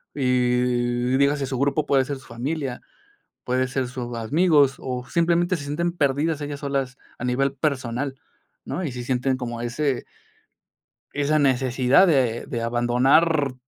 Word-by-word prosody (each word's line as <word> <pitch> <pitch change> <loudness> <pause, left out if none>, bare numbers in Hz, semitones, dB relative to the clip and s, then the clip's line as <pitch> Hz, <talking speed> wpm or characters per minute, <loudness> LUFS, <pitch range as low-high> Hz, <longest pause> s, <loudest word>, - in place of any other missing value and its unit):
y 125 -1 +1
dígase, 140 0 +2
su 130 0 -3
grupo 145 +2 +1
puede 135 -1 +3
ser 140 +1 -4
su 130 - -16
familia, 130 +2 -4 0.6
puede 130 +1 0
ser 130 -1 -2
sus 120 -2 -6
amigos, 145 +3 +3
o 125 -1 -4
simplemente 170 +1 +2
se 145 - -7
sienten 160 +5 -1
perdidas 150 0 0
ellas 145 -1 -5
solas 135 -3 -2 0.2
a 120 - -6
nivel 135 +2 +1
personal, 135 -2 -2 0.5
¿no?, 185 - -4
y 145 - -3
sí 125 0 -6
sienten 130 +1 0
como 120 -2 -5
ese 125 +2 -1 1.1
esa 145 +2 +1
necesidad 130 +3 +3
de 130 -8 +1
de 115 - -4
abandonar 130 +5 +2
135 Hz, 145 wpm, -23 LUFS, 125-145 Hz, 1.1 s, puede